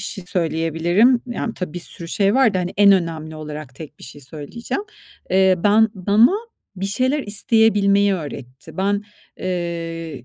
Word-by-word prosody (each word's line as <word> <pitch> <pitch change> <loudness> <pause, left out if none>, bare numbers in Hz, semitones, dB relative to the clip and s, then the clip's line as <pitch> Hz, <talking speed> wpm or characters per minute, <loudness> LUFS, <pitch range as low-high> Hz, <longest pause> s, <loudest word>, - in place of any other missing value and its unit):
şey 195 -4 -6
söyleyebilirim. 175 - +1
Yani, 240 -1 -4
tabii, 180 -5 -5
bir - - -3
sürü 165 0 -4
şey 200 +2 +1
var 260 -6 +4
da, 185 - +1
hani, 180 0 -3
en 200 0 +7
önemli 160 -4 -2
olarak 150 -3 -8
tek 155 0 -11
bir - - -12
şey 145 +3 -12
söyleyeceğim. 160 - -6 0.5
Eee, 190 0 +4
ben 215 +2 +5
bana 205 - +4 0.4
bir 195 +1 -3
şeyler 255 +8 0
isteyebilmeyi 205 -1 +2
öğretti. 135 -6 -9
Ben, 200 +2 0 0.4
eee, 165 -5 -4
185 Hz, 150 wpm, -20 LUFS, 165-205 Hz, 0.5 s, en